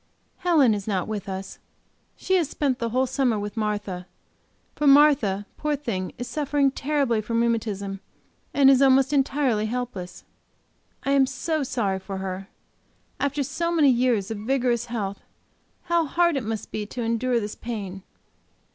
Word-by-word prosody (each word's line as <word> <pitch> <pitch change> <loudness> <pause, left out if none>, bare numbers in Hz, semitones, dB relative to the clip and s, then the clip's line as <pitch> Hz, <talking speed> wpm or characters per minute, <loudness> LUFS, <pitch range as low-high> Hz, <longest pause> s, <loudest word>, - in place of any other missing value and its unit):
Helen 315 - +4
is 205 -1 -4
not 190 -4 -1
with 210 -2 -4
us; 190 0 -6 0.6
she 380 - -2
has 330 -6 0
spent 270 -5 -1
the 230 - -1
whole 255 +3 +2
summer 260 -3 +1
with 205 +1 -5
Martha; 205 -4 -3 0.7
for 295 - 0
Martha, 275 -9 +5
poor 300 0 0
thing, 205 -10 -3
is 245 - -5
suffering 285 +1 +1
terribly 275 -5 0
from 230 +2 -1
rheumatism 210 -4 -1 0.5
and 275 -1 +6
is 270 0 +4
almost 270 +1 +4
entirely 265 -6 +1
helpless. 215 -7 -5 0.8
I 275 - 0
am 275 -1 +4
so 305 +4 -2
sorry 205 -8 -1
for 195 0 -6
her, 190 0 -5 0.7
after 280 0 0
so 335 +6 -2
many 305 -5 +5
years 235 -5 +1
of 220 - -4
vigorous 240 +1 0
health, 200 -4 -4 0.6
how 340 -2 +1
hard 340 +2 +2
it 270 - 0
must 220 -1 -4
be 210 -1 -4
to 240 +3 -5
endure 235 +2 +1
this 210 -1 -4
pain. 200 -5 -6
240 Hz, 155 wpm, -25 LUFS, 205-275 Hz, 0.8 s, and